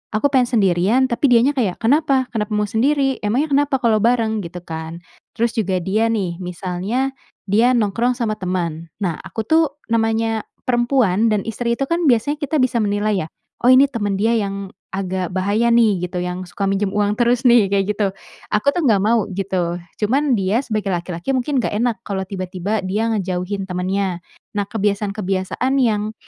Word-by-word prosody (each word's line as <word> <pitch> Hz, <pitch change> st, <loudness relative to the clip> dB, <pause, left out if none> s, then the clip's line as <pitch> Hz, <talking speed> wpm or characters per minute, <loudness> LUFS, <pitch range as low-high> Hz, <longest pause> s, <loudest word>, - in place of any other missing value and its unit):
aku 215 Hz, +7 st, +3 dB
pengen 255 Hz, -3 st, +3 dB
sendirian, 215 Hz, +2 st, +2 dB
tapi 235 Hz, +4 st, +2 dB
dianya 245 Hz, +3 st, +5 dB
kayak, 215 Hz, -9 st, -1 dB
"Kenapa? 270 Hz, +1 st, +2 dB
Kenapa 210 Hz, 0 st, -2 dB
mau 210 Hz, 0 st, 0 dB
sendiri? 270 Hz, +5 st, +1 dB
Emangnya 255 Hz, +9 st, 0 dB
kenapa 285 Hz, 0 st, +2 dB
kalau 220 Hz, -2 st, +3 dB
bareng?" 225 Hz, -3 st, +1 dB
Gitu 175 Hz, +1 st, -7 dB
kan. 160 Hz, 0 st, -6 dB, 0.4 s
Terus 235 Hz, +1 st, 0 dB
juga 190 Hz, -4 st, 0 dB
dia 215 Hz, +5 st, +1 dB
nih, 190 Hz, -6 st, -1 dB
misalnya 185 Hz, +9 st, -2 dB, 0.4 s
dia 225 Hz, +6 st, +4 dB
nongkrong 235 Hz, +2 st, +1 dB
sama 230 Hz, -3 st, -1 dB
teman. 170 Hz, -3 st, -3 dB, 0.2 s
Nah, 175 Hz, -4 st, 0 dB
aku 190 Hz, +4 st, -5 dB
tuh 320 Hz, +1 st, +4 dB, 0.3 s
namanya 225 Hz, -1 st, +1 dB, 0.2 s
perempuan 240 Hz, -4 st, +2 dB
dan 210 Hz, -2 st, +1 dB
istri 235 Hz, +1 st, -1 dB
itu -, -, +1 dB
kan 335 Hz, +2 st, 0 dB
biasanya 265 Hz, +4 st, +2 dB
kita 290 Hz, 0 st, -2 dB
bisa 255 Hz, -2 st, +1 dB
menilai 205 Hz, -3 st, 0 dB
ya, -, -, -10 dB, 0.4 s
"Oh -, -, +5 dB
ini 260 Hz, +2 st, +7 dB
teman 205 Hz, -4 st, -1 dB
dia 215 Hz, +4 st, +1 dB
yang 200 Hz, -2 st, -3 dB, 0.2 s
agak 190 Hz, -1 st, -2 dB
bahaya 200 Hz, +5 st, +1 dB
nih," 215 Hz, -6 st, +3 dB
gitu, 180 Hz, 0 st, -4 dB
"yang 180 Hz, +1 st, -4 dB
suka 195 Hz, +2 st, -2 dB
minjem 195 Hz, 0 st, -1 dB
uang 210 Hz, 0 st, +1 dB
terus 240 Hz, +1 st, +2 dB
nih." 240 Hz, -5 st, +5 dB
Kayak 195 Hz, 0 st, +1 dB
gitu. 205 Hz, -, +2 dB, 0.5 s
Aku 210 Hz, +6 st, +3 dB
tuh 340 Hz, 0 st, -1 dB
enggak 205 Hz, -5 st, +4 dB
mau, 220 Hz, 0 st, +2 dB
gitu. 185 Hz, -3 st, -1 dB, 0.2 s
Cuman 260 Hz, +4 st, +2 dB
dia 195 Hz, +6 st, +1 dB
sebagai 215 Hz, -5 st, -3 dB
laki-laki 175 Hz, +6 st, -3 dB
mungkin 265 Hz, +3 st, -1 dB
enggak 240 Hz, -, -1 dB
enak, 235 Hz, +1 st, 0 dB
kalau 195 Hz, -1 st, -2 dB
tiba-tiba 185 Hz, +2 st, -3 dB
dia 210 Hz, +5 st, 0 dB
ngejauhin 190 Hz, -1 st, -2 dB
temennya. 185 Hz, 0 st, -2 dB, 0.3 s
Nah, 205 Hz, -, +1 dB
kebiasaan-kebiasaan 200 Hz, +2 st, -1 dB
yang, 215 Hz, -2 st, 0 dB
210 Hz, 175 wpm, -20 LUFS, 190-240 Hz, 0.5 s, ini